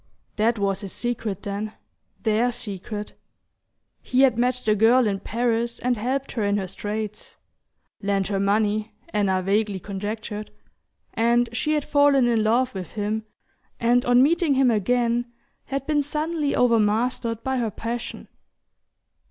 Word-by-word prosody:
That 225 +2 +2
was 200 -1 0
his 195 -2 -6
secret, 225 -5 -3
then, 205 +2 -4 0.5
THEIR 225 +2 +2
secret: 205 0 -5 0.9
he 255 - +1
had 265 -3 +5
met 250 +2 +1
the 215 - +4
girl 230 +4 +5
in 200 -2 0
Paris 235 +2 -1
and 250 0 0
helped 260 +5 -2
her 225 - -2
in 200 0 +1
her 195 - -2
straits 210 +2 -5 0.6
lent 200 -2 0
her 195 -2 0
money, 210 +2 +1
Anna 190 - +1
vaguely 200 0 +1
conjectured 210 +2 -5 0.6
and 235 +1 +2
she 305 +6 0
had 300 -2 +1
fallen 285 -3 +4
in 230 -2 +2
love 240 +4 +2
with 185 -3 -7
him, 215 +1 -2 0.5
and 240 +1 +3
on 245 +1 +5
meeting 320 -1 +3
him 260 -2 +4
again 235 +3 +1 0.3
had 275 -1 -3
been 300 -1 +2
suddenly 300 +1 -1
overmastered 230 0 +1
by 265 0 -1
her 230 -2 0
passion. 230 +3 -5
230 Hz, 145 wpm, -24 LUFS, 210-245 Hz, 0.9 s, had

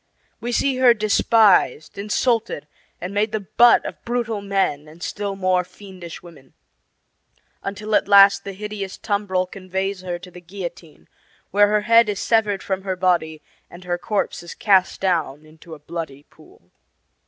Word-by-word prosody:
We 240 +2 -4
see 265 +2 +1
her 250 -2 +5
despised, 210 - +3
insulted, 215 - -1 0.3
and 180 +3 -6
made 210 +1 0
the 215 - -1
butt 235 +5 +4
of - - -8
brutal 235 -3 -2
men 195 -7 -1
and 160 +3 -13
still 200 -1 -4
more 185 -1 +1
fiendish 185 -3 -11
women; 150 -7 -16 1.1
until 210 +2 -5
at - - +3
last 200 0 +6
the 200 - -6
hideous 205 -1 -6
tumbrel 200 -3 -1
conveys 190 +1 -4
her 180 -1 -4
to 180 +1 -13
the 180 - -12
guillotine, 175 -3 -9 0.4
where 205 +1 +5
her 210 0 +1
head 230 0 +5
is 200 -2 -2
severed 210 -4 +1
from 190 -1 -2
her 190 -1 -3
body 170 -4 0 0.3
and 175 +1 -13
her 175 0 -3
corpse 210 +2 -2
is 170 - -10
cast 195 -3 +2
down 160 -6 -1
into 160 +1 -13
a - - -15
bloody 150 -3 -7
pool. 90 - -22
195 Hz, 160 wpm, -21 LUFS, 175-210 Hz, 1.1 s, last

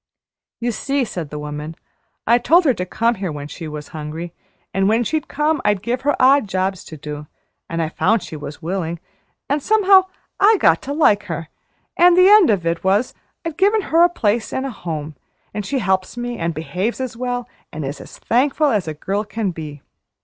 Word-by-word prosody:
"You 240 0 -1
see," 275 +4 -1
said 170 -8 -5
the 150 - -6
woman, 150 +2 -6 0.5
"I 235 +2 +4
told 335 +8 +4
her 270 - +4
to 180 -4 -4
come 230 +5 +1
here 185 -4 -2
when 145 -1 -6
she 160 +2 -8
was 150 -1 -7
hungry, 160 +2 -6 0.4
and 195 +1 +2
when 225 +2 +3
she'd 310 +5 -2
come 300 +1 0
I'd 205 -2 +1
give 245 +2 -1
her 285 +1 +1
odd 270 -2 +5
jobs 190 0 -1
to 155 - -9
do, 150 0 -7 0.4
an' 165 0 -2
I 160 - -1
found 220 +5 +1
she - - -8
was 145 +1 -8
willing, 170 -1 -3 0.5
an' 285 +2 +1
somehow 390 +1 +5 0.3
I 420 +2 +6
got 165 0 +4
to - - -2
like 210 -9 +3
her; 165 -4 -5 0.5
an' 350 0 +6
the 365 +1 +7
end 415 -4 +7
of 195 -6 +1
it 165 0 -1
was 200 +6 +2 0.3
I've 330 -2 -4
given 415 +3 +3
her 330 - +6
a 350 - +6
place 225 -8 0
an' 265 - -2
a 270 - -3
home, 155 -7 -5 0.4
an' 210 - -2
she 270 +7 -2
helps 190 -1 0
me, 240 0 -3
an' 170 0 -1
behaves 180 - -3
as 260 -3 -4
well, 245 0 -3 0.2
an' 155 - -5
is 140 +2 -5
as - - -12
thankful 280 +4 +2
as 200 -7 0
a 155 - -4
girl 195 +7 -2
can 210 -1 -3
be. 150 -4 -8
205 Hz, 210 wpm, -20 LUFS, 165-265 Hz, 0.5 s, the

